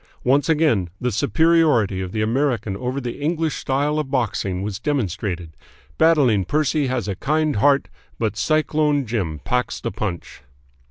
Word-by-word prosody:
Once 135 +3 +2
again 150 - +2
the 125 0 -1
superiority 145 - +2
of 90 -1 -5
the 110 +1 -1
American 115 -3 0
over 125 +5 -3
the 125 0 -6
English 160 +1 0
style 145 +3 0
of 150 -3 -3
boxing 105 -7 -1
was 100 -1 -4
demonstrated. 100 - -3 0.4
Battling 140 -11 +4
Percy 150 - 0
has 125 -4 -2
a 100 - -2
kind 155 +3 0
heart, 140 +6 +3 0.3
but 110 -3 -1
Cyclone 150 0 +1
Jim 95 -10 -3
packs 125 0 -1
the - - -4
punch." 100 -4 -5
125 Hz, 150 wpm, -21 LUFS, 105-150 Hz, 0.4 s, Battling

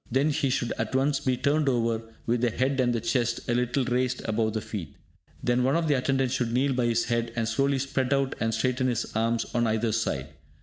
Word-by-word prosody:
Then 135 +5 +2
he 140 -1 0
should 125 -2 -1
at 110 +3 -2
once 140 +1 +2
be 130 -1 0
turned 145 +2 +2
over, 115 -3 +1 0.2
with 120 0 +1
the 120 - +3
head 130 +4 0
and 125 -1 +3
the 120 - 0
chest 120 0 0
a 120 - +1
little 125 +2 +1
raised 125 +1 0
above 110 0 0
the 110 - -1
feet. 85 -12 -6 0.5
Then 125 0 +2
one 135 +2 +2
of 165 -1 +1
the 150 - +3
attendants 135 -1 +1
should 125 -3 0
kneel 135 +3 +2
by 125 -2 +1
his 115 0 +1
head, 115 0 -1
and 115 -2 0
slowly 135 +4 +1
spread 135 -1 -1
out 135 -1 +1
and 115 0 0
straighten 130 +3 0
his 120 -2 0
arms 115 +1 +1
on 120 -1 +2
either 110 +1 +1
side. 110 +1 -1
125 Hz, 230 wpm, -27 LUFS, 115-135 Hz, 0.5 s, the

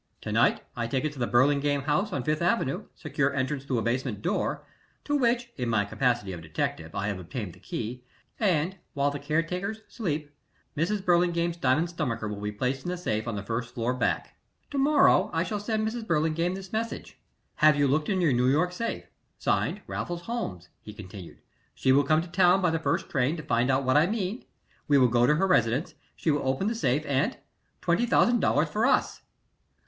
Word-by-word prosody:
To - - -5
night - - +3
I 120 -1 -2
take 130 +4 -1
it 150 - -2
to 140 - -11
the 120 - 0
Burlingame 140 +3 +2
house 155 +9 0
on 140 -7 -2
Fifth 150 +4 0
Avenue, 170 - 0
secure 140 -1 -1
entrance 135 +1 -1
through 130 -3 -1
a 115 - 0
basement 120 -3 -2
door, - - -1 0.4
to 290 - 0
which, 240 -3 +1
in 125 -3 -2
my 110 -3 +2
capacity 120 -3 0
of 85 - -7
detective, 80 0 -3
I 100 - -1
have 100 -3 -2
obtained 90 +1 -6
the - - -17
key, 125 +3 -5 0.4
and, 185 -3 +1 0.2
while 140 0 +2
the 145 - -5
caretakers 180 +8 -2
sleep, 150 -9 -3 0.4
Mrs. 190 +6 -1
Burlingame's 170 -1 +2
diamond 145 +3 +2
stomacher 115 -9 -2
will 105 -1 -5
be 105 0 -2
placed 130 +5 -2
in - - -4
the 180 - -2
safe 110 -11 -2
on 115 - -2
the 100 - -4
first 115 +3 -4
floor 120 +1 0
back. 125 - -1 0.4
"To 280 - -1
morrow 290 +1 +5
morning - - -9
I 165 - +2
shall 210 +3 -3
send 215 +1 -1
Mrs. 225 0 -4
Burlingame 165 +2 +1
this 190 0 -9
message: 225 +1 -4 0.4
'Have 155 -1 +6
you 145 0 +3
looked 150 +3 +1
in 190 -3 +1
your 160 -6 +3
New 125 +1 +2
York 155 +7 +2
safe? 230 +6 -3 0.3
[Signed] - - 0
Raffles 175 0 -4
Holmes,'" 105 - -5
he 105 - -10
continued. 95 -3 -11 0.3
"She 130 - +2
will 140 +2 +5
come 155 +3 +2
to - - -9
town 180 +1 +4
by 180 -3 +2
the 165 - 0
first 140 -3 -1
train 135 +5 0
to 155 - -6
find 125 -3 +1
out 135 +1 +2
what 130 +2 +3
I 155 +3 +5
mean; 210 +1 -3 0.4
we 145 - +5
will 125 -2 +5
go 120 +1 +3
to 150 - +4
her 195 - +2
residence; 130 - +2 0.2
she 160 - 0
will 145 -2 -1
open 130 +8 0
the 220 - +1
safe, 150 - 0
and 135 -2 0 0.5
$20,000 230 -4 +3
for 215 - +1
us." - - +1
145 Hz, 205 wpm, -27 LUFS, 125-180 Hz, 0.5 s, Have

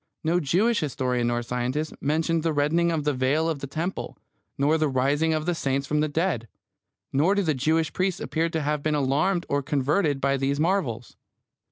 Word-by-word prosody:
No 165 +2 +2
Jewish 190 - +2
historian 125 -4 -1
nor 120 0 0
scientist 125 +6 -2
mentioned 160 +3 +1
the 165 0 0
rending 160 +4 +2
of 160 -3 -1
the 150 0 +1
veil 135 +5 +1
of 160 -3 -1
the 140 - -5
temple, 165 +7 -4 0.4
nor 145 +3 +3
the 155 -1 +2
rising 140 +5 +1
of 155 -1 -1
the 175 - +1
saints 140 -3 -1
from 150 +2 0
the 155 - +2
dead. 150 -6 -1 0.7
Nor 160 +9 +3
do 200 - +1
the 160 -3 +1
Jewish 155 +4 0
priests 185 -1 0
appear 165 +1 -1
to 160 -2 -2
have 150 0 -1
been 155 +1 0
alarmed 150 +6 +1
or 140 0 0
converted 145 +2 +1
by 140 0 +1
these 135 +1 -1
marvels. 155 - -1
150 Hz, 195 wpm, -25 LUFS, 135-165 Hz, 0.7 s, nor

